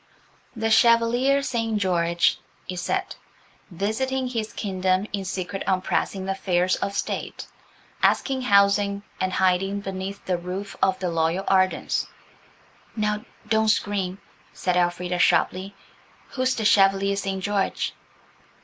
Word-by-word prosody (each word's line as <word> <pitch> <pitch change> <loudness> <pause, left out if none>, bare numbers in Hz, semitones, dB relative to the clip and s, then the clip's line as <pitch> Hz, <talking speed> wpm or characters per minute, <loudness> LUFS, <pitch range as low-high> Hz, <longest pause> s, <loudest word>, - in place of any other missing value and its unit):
"The 225 -1 -1
Chevalier 240 +4 +4
St. 230 -4 -1
George," 170 -3 +1 0.3
it 180 - -5
said, 380 - -2 0.5
"visiting 250 +8 -2
his 225 -3 -3
kingdom 185 -1 0
in 200 -1 -2
secret 190 +1 -4
on 185 -1 +1
pressing 190 -1 -1
affairs 185 -1 +1
of 200 - -3
State, - - -4 0.6
asks - - +2
housing 200 -1 +3 0.2
and 185 0 -1
hiding 190 +2 +1
beneath 195 0 -6
the 180 -2 0
roof 185 +3 -6
of 190 -1 +3
the 180 -2 -2
loyal 165 +3 0
Ardens." 185 -1 +1 0.9
"Now, 210 -1 -1 0.2
don't 220 0 +2
scream," 200 -3 0 0.3
said 180 -1 -1
Elfrida 180 0 0
sharply; 190 +3 +2 0.5
"who's 255 0 0
the 220 - -2
Chevalier 195 -1 +4
St. 195 -1 -3
George?" 205 -1 -1
195 Hz, 120 wpm, -24 LUFS, 185-215 Hz, 0.9 s, Chevalier